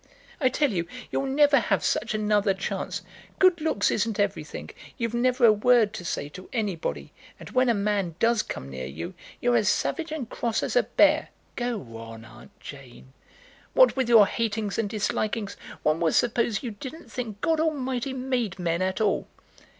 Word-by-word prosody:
"I 260 Hz, -4 st, +3 dB
tell 285 Hz, +1 st, +1 dB
you 170 Hz, -4 st, -2 dB, 0.2 s
you'll 275 Hz, -, -1 dB
never 285 Hz, +1 st, +5 dB
have -, -, 0 dB
such -, -, 0 dB
another 210 Hz, -2 st, +2 dB
chance. 190 Hz, -, -4 dB, 0.3 s
Good 365 Hz, -3 st, +4 dB
looks 305 Hz, -10 st, +1 dB
isn't 220 Hz, 0 st, -1 dB
everything. 205 Hz, -, -2 dB, 0.3 s
You've 230 Hz, -3 st, -2 dB
never 250 Hz, +1 st, +3 dB
a 220 Hz, -, +7 dB
word 220 Hz, 0 st, +4 dB
to 180 Hz, -, -6 dB
say 145 Hz, -4 st, -3 dB
to 185 Hz, +5 st, -11 dB
anybody; 205 Hz, -8 st, -3 dB, 0.3 s
and -, -, -10 dB
when 255 Hz, -1 st, +3 dB
a 235 Hz, -, +3 dB
man 200 Hz, -4 st, -1 dB
does 230 Hz, +1 st, +3 dB
come 65 Hz, -, -6 dB
near 65 Hz, -1 st, -6 dB
you, 80 Hz, +6 st, -6 dB, 0.3 s
you're 245 Hz, 0 st, +2 dB
as 215 Hz, -4 st, +3 dB
savage 330 Hz, +6 st, -1 dB
and 300 Hz, -7 st, -4 dB
cross 230 Hz, 0 st, -2 dB
as -, -, -2 dB
a -, -, +6 dB
bear." -, -, +3 dB, 0.3 s
"Go 220 Hz, -, -4 dB
on, 115 Hz, 0 st, -10 dB
Aunt 120 Hz, +1 st, -16 dB
Jane." 130 Hz, -2 st, -12 dB, 0.6 s
"What -, -, +6 dB
with 260 Hz, -3 st, 0 dB
your 225 Hz, -3 st, +8 dB
hatings 220 Hz, -1 st, -2 dB
and 215 Hz, -3 st, 0 dB
dislikings, 210 Hz, 0 st, -2 dB, 0.3 s
one 155 Hz, +1 st, +2 dB
would 165 Hz, -2 st, +1 dB
suppose 235 Hz, 0 st, +1 dB
you 240 Hz, -, -3 dB
didn't 265 Hz, +10 st, -9 dB
think 225 Hz, -5 st, -5 dB
God 325 Hz, -1 st, +2 dB
Almighty 270 Hz, -5 st, -1 dB
made 250 Hz, -6 st, -2 dB
men 170 Hz, -1 st, -1 dB
at 185 Hz, +3 st, -1 dB
all." 210 Hz, -, +1 dB
220 Hz, 180 wpm, -26 LUFS, 190-255 Hz, 0.6 s, your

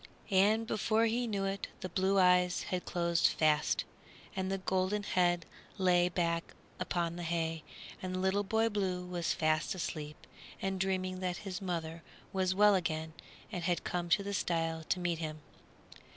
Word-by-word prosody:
And 210 Hz, +4 st, +4 dB
before 220 Hz, +1 st, +2 dB
he 235 Hz, +2 st, 0 dB
knew 200 Hz, -3 st, -1 dB
it 195 Hz, 0 st, -2 dB
the 185 Hz, -, -3 dB
blue 190 Hz, +2 st, +2 dB
eyes 180 Hz, -1 st, +4 dB
had 180 Hz, -1 st, -3 dB
closed 170 Hz, -1 st, +2 dB
fast, 155 Hz, -1 st, +2 dB, 0.5 s
and 190 Hz, 0 st, -1 dB
the 195 Hz, -, 0 dB
golden 190 Hz, +2 st, 0 dB
head 175 Hz, -3 st, +2 dB, 0.3 s
lay 180 Hz, -2 st, +4 dB
back 170 Hz, -1 st, -1 dB, 0.2 s
upon 170 Hz, -1 st, -1 dB
the -, -, -4 dB
hay, 165 Hz, -1 st, -1 dB, 0.4 s
and 185 Hz, 0 st, -3 dB
Little 190 Hz, +2 st, +2 dB
Boy 220 Hz, +3 st, +2 dB
Blue 190 Hz, -4 st, -1 dB
was 175 Hz, -2 st, -1 dB
fast 155 Hz, +1 st, +1 dB
asleep 150 Hz, -4 st, -5 dB, 0.3 s
and 195 Hz, -1 st, -2 dB
dreaming 185 Hz, -1 st, -1 dB
that 180 Hz, -1 st, -2 dB
his 190 Hz, -1 st, -4 dB
mother 165 Hz, -3 st, -3 dB, 0.3 s
was 185 Hz, -1 st, +1 dB
well 210 Hz, +1 st, +6 dB
again 160 Hz, -3 st, -1 dB, 0.4 s
and 180 Hz, -5 st, -3 dB
had 175 Hz, -1 st, 0 dB
come 175 Hz, -1 st, -2 dB
to 200 Hz, +4 st, +4 dB
the 200 Hz, 0 st, -3 dB
stile 165 Hz, -3 st, -1 dB
to 185 Hz, -, 0 dB
meet 175 Hz, -2 st, -1 dB
him. 155 Hz, -2 st, -5 dB
180 Hz, 165 wpm, -33 LUFS, 170-195 Hz, 0.5 s, well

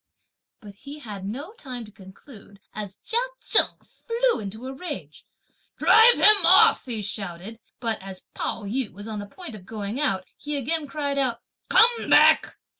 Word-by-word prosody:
But 205 Hz, -2 st, -12 dB
he 285 Hz, +6 st, -10 dB
had 210 Hz, -9 st, -8 dB
no 280 Hz, -, -6 dB
time 255 Hz, -, -8 dB
to 210 Hz, -, -15 dB
conclude, 200 Hz, +2 st, -15 dB
as 205 Hz, -2 st, -7 dB
Chia 465 Hz, -, +1 dB, 0.2 s
Cheng -, -, +2 dB
flew 475 Hz, +1 st, -1 dB
into 220 Hz, +4 st, -7 dB
a 265 Hz, -, -5 dB
rage. 230 Hz, -, -8 dB, 0.5 s
"Drive 450 Hz, +2 st, +6 dB
him 425 Hz, -1 st, +5 dB
off," -, -, +5 dB
he 230 Hz, -5 st, -4 dB
shouted; 195 Hz, +1 st, -6 dB, 0.2 s
(but 230 Hz, -4 st, -3 dB
as 190 Hz, -1 st, -10 dB
Pao 225 Hz, -, -4 dB
yü) 225 Hz, +3 st, -3 dB
was 205 Hz, +4 st, -10 dB
on 215 Hz, -2 st, -5 dB
the 205 Hz, -, -7 dB
point 355 Hz, -, -10 dB
of 210 Hz, -4 st, -11 dB
going 210 Hz, +4 st, -5 dB
out, 195 Hz, -11 st, 0 dB
he 295 Hz, 0 st, -5 dB
again 295 Hz, +3 st, -2 dB
cried 285 Hz, -1 st, -2 dB
out: 245 Hz, -4 st, -1 dB, 0.3 s
"Come 470 Hz, 0 st, +4 dB
back! -, -, +5 dB
230 Hz, 170 wpm, -24 LUFS, 200-295 Hz, 0.5 s, Drive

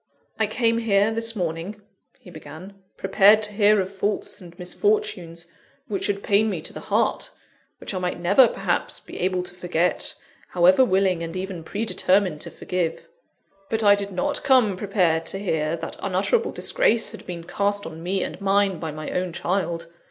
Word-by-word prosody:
"I 220 Hz, -, +2 dB
came 230 Hz, +1 st, +1 dB
here, 210 Hz, -1 st, +2 dB
this 230 Hz, 0 st, -1 dB
morning," 175 Hz, +2 st, -3 dB, 0.4 s
he 180 Hz, -, -15 dB
began, 155 Hz, +5 st, -10 dB, 0.2 s
"prepared 200 Hz, +3 st, +5 dB
to 210 Hz, 0 st, -2 dB
hear 210 Hz, 0 st, +4 dB
of 190 Hz, +1 st, -3 dB
faults 200 Hz, +1 st, -2 dB
and 175 Hz, -1 st, -13 dB
misfortunes 180 Hz, -, -1 dB, 0.4 s
which 205 Hz, -5 st, -2 dB
should 200 Hz, -1 st, -1 dB
pain 210 Hz, +2 st, +3 dB
me 185 Hz, -5 st, -2 dB
to -, -, -3 dB
the -, -, -7 dB
heart; -, -, 0 dB, 0.5 s
which -, -, -5 dB
I 185 Hz, -, -2 dB
might 180 Hz, -1 st, -2 dB
never, 200 Hz, +9 st, +5 dB
perhaps, -, -, -2 dB
be -, -, -10 dB
able 185 Hz, 0 st, 0 dB
to 180 Hz, -, -8 dB
forget, 180 Hz, -1 st, -1 dB, 0.4 s
however 180 Hz, +7 st, +6 dB
willing 190 Hz, -6 st, +2 dB
and 165 Hz, +1 st, -5 dB
even 185 Hz, -2 st, -5 dB
predetermined 185 Hz, -4 st, +1 dB
to -, -, -6 dB
forgive. 175 Hz, -3 st, -3 dB, 0.6 s
But 220 Hz, 0 st, 0 dB
I 205 Hz, -1 st, +7 dB
did 200 Hz, 0 st, -2 dB
not 180 Hz, -1 st, -2 dB
come 255 Hz, -8 st, +4 dB
prepared 180 Hz, -5 st, +1 dB
to -, -, -4 dB
hear, 160 Hz, -5 st, -1 dB
that 165 Hz, -, -7 dB
unutterable 200 Hz, -, +1 dB
disgrace 370 Hz, -, +1 dB
had -, -, -12 dB
been 175 Hz, -2 st, -6 dB
cast 200 Hz, +3 st, -1 dB
on 160 Hz, 0 st, -8 dB
me 185 Hz, +2 st, -1 dB
and -, -, -6 dB
mine, 195 Hz, -2 st, +2 dB
by 160 Hz, -, -4 dB
my 155 Hz, 0 st, -6 dB
own 180 Hz, -1 st, -2 dB
child. 170 Hz, -2 st, -2 dB
190 Hz, 175 wpm, -24 LUFS, 175-205 Hz, 0.6 s, I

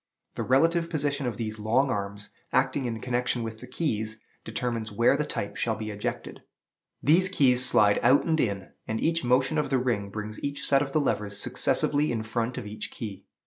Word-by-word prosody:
The -, -, -4 dB
relative 165 Hz, +6 st, +2 dB
position 145 Hz, -3 st, -1 dB
of 115 Hz, -4 st, -3 dB
these 110 Hz, -1 st, -4 dB
long 130 Hz, +6 st, +2 dB
arms, 100 Hz, -1 st, -4 dB, 0.2 s
acting 135 Hz, -, +1 dB
in 115 Hz, -2 st, -3 dB
connection 125 Hz, -1 st, -1 dB
with 110 Hz, -1 st, -6 dB
the 125 Hz, -, -10 dB
keys, 110 Hz, -6 st, -2 dB, 0.2 s
determines 115 Hz, -1 st, -3 dB
where 115 Hz, +6 st, +3 dB
the 150 Hz, +1 st, -1 dB
type 100 Hz, -, -4 dB
shall 115 Hz, -2 st, 0 dB
be 110 Hz, 0 st, -5 dB
ejected. 105 Hz, 0 st, -5 dB, 0.6 s
These 175 Hz, +6 st, +5 dB
keys 130 Hz, -9 st, +4 dB
slide 105 Hz, -5 st, +5 dB
out 130 Hz, +4 st, +4 dB
and 160 Hz, -2 st, +1 dB
in, 100 Hz, -6 st, -1 dB, 0.2 s
and 110 Hz, 0 st, -2 dB
each 165 Hz, -1 st, +1 dB
motion 130 Hz, +5 st, +2 dB
of 150 Hz, -, -1 dB
the 135 Hz, -, +2 dB
ring 120 Hz, -6 st, -1 dB
brings 105 Hz, +1 st, -6 dB
each 140 Hz, 0 st, -2 dB
set 135 Hz, -1 st, +4 dB
of 140 Hz, -1 st, -2 dB
the 155 Hz, -, +2 dB
levers 105 Hz, -7 st, -1 dB
successively 145 Hz, +7 st, +1 dB
in 115 Hz, -2 st, -2 dB
front 115 Hz, +2 st, -2 dB
of 125 Hz, -, -5 dB
each 105 Hz, +1 st, -6 dB
key. 100 Hz, -3 st, -8 dB
120 Hz, 195 wpm, -27 LUFS, 110-140 Hz, 0.6 s, These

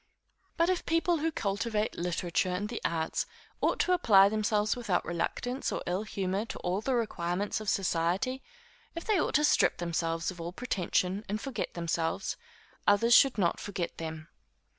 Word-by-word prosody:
But 335 Hz, +2 st, +3 dB
if 365 Hz, -, -1 dB
people 330 Hz, +1 st, +2 dB
who 320 Hz, +2 st, 0 dB
cultivate 210 Hz, -2 st, -1 dB
literature 175 Hz, +1 st, -1 dB
and 185 Hz, +3 st, -2 dB
the 240 Hz, -, -5 dB
arts 160 Hz, -1 st, -1 dB, 0.3 s
ought -, -, +2 dB
to 365 Hz, -, +1 dB
apply 200 Hz, -, +6 dB
themselves 210 Hz, 0 st, +1 dB
without 230 Hz, -7 st, -1 dB
reluctance 245 Hz, +10 st, -2 dB
or -, -, -3 dB
ill 180 Hz, +3 st, -1 dB
humor 195 Hz, -1 st, -2 dB
to -, -, -7 dB
all 180 Hz, +3 st, -1 dB
the 260 Hz, +3 st, 0 dB
requirements 200 Hz, -3 st, -1 dB
of 215 Hz, -, -2 dB
society; 190 Hz, +9 st, 0 dB, 0.5 s
if 335 Hz, -, -5 dB
they 425 Hz, -4 st, +3 dB
ought -, -, -1 dB
to 300 Hz, -, +4 dB
strip 295 Hz, -, +4 dB
themselves 165 Hz, -1 st, -1 dB
of 175 Hz, -2 st, -9 dB
all 170 Hz, +1 st, -5 dB
pretension, 190 Hz, -3 st, -1 dB
and 210 Hz, +2 st, -1 dB
forget 270 Hz, +1 st, -4 dB
themselves, 170 Hz, +2 st, -1 dB, 0.5 s
others 215 Hz, +4 st, +5 dB
should 270 Hz, 0 st, +6 dB
not 175 Hz, -4 st, +1 dB
forget 185 Hz, -4 st, -4 dB
them. 160 Hz, -1 st, -6 dB
200 Hz, 165 wpm, -30 LUFS, 175-240 Hz, 0.5 s, apply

